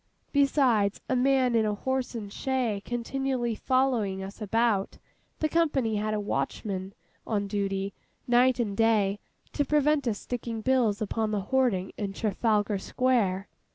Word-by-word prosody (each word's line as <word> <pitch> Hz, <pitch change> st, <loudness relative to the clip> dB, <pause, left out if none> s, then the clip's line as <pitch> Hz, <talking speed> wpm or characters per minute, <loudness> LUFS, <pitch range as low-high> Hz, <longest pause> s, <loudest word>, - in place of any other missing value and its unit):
Besides 260 Hz, -8 st, +3 dB
a 260 Hz, -, +1 dB
man 260 Hz, -1 st, +3 dB
in 225 Hz, -1 st, +3 dB
a 210 Hz, -1 st, 0 dB
horse 260 Hz, +3 st, -2 dB
and 205 Hz, -3 st, -6 dB
shay 250 Hz, -6 st, -1 dB
continually 245 Hz, 0 st, -2 dB
following 230 Hz, -6 st, 0 dB
us 195 Hz, +3 st, -9 dB
about, 215 Hz, -1 st, +1 dB, 0.4 s
the 310 Hz, -, +3 dB
company 285 Hz, -10 st, +1 dB
had 215 Hz, +1 st, -1 dB
a -, -, -1 dB
watchman 195 Hz, -1 st, -3 dB, 0.3 s
on 205 Hz, -3 st, 0 dB
duty, 195 Hz, -1 st, -2 dB, 0.3 s
night 250 Hz, +1 st, +4 dB
and 210 Hz, -4 st, -1 dB
day, 210 Hz, -2 st, +2 dB, 0.3 s
to 290 Hz, -, +1 dB
prevent 295 Hz, -1 st, +2 dB
us 215 Hz, -3 st, 0 dB
sticking 230 Hz, -1 st, -5 dB
bills 230 Hz, -4 st, +2 dB
upon 220 Hz, +1 st, -1 dB
the 210 Hz, -2 st, -1 dB
hoarding 210 Hz, -4 st, +1 dB
in 200 Hz, -2 st, -3 dB
Trafalgar 210 Hz, -1 st, 0 dB
Square. 205 Hz, -5 st, +1 dB
225 Hz, 145 wpm, -28 LUFS, 205-255 Hz, 0.4 s, night